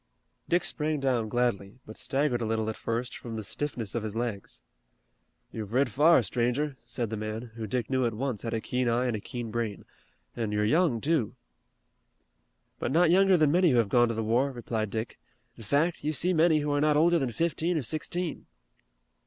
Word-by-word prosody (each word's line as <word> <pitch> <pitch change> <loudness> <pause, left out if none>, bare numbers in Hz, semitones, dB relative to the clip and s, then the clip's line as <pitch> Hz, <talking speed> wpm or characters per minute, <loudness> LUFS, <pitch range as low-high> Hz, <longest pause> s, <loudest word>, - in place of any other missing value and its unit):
Dick 175 +1 +2
sprang 155 -1 -2
down 125 -5 0
gladly, 120 -4 -1
but 110 - -10
staggered 135 -3 -1
a - - -1
little 110 0 0
at - - -9
first 115 +2 -3
from 115 -2 -7
the 110 - -4
stiffness 120 -3 -4
of 120 - -1
his 110 0 -5
legs. 115 -4 -4 0.9
"You've 110 -1 -6
rid 130 0 +2
far, 150 0 +5
stranger," 125 +7 -1
said 115 -4 -4
the 110 - -2
man, 110 +2 -5
who 110 -1 -5
Dick 120 0 -2
knew 130 -1 +1
at 115 - -3
once 125 -3 -3
had 115 -1 -3
a 110 - -2
keen 125 +1 -1
eye 120 +2 +1
and 120 -3 0
a - - -3
keen 120 +1 -6
brain, 115 -3 -3 0.5
"an' 115 -3 -2
you're 105 0 +1
young, 140 -1 +2
too." 150 -8 0 1.4
"But - - -2
not 165 +2 +4
younger 190 0 +5
than 155 -3 +3
many 175 +1 +4
who 125 - +3
have 115 -4 +2
gone 120 +1 +4
to 115 - -2
the 110 - -1
war," 120 +6 +1
replied 115 -4 -3
Dick. 110 +2 -4 0.4
"In - - -13
fact, 145 - +1
you 155 +1 0
see 180 +5 +1
many 160 -2 +4
who 145 0 -1
are 145 0 +1
not 150 -1 +3
older 170 +2 +4
than 135 -4 -1
fifteen 165 +6 0
or 150 - -1
sixteen." 160 +5 -4
125 Hz, 205 wpm, -28 LUFS, 110-150 Hz, 1.4 s, far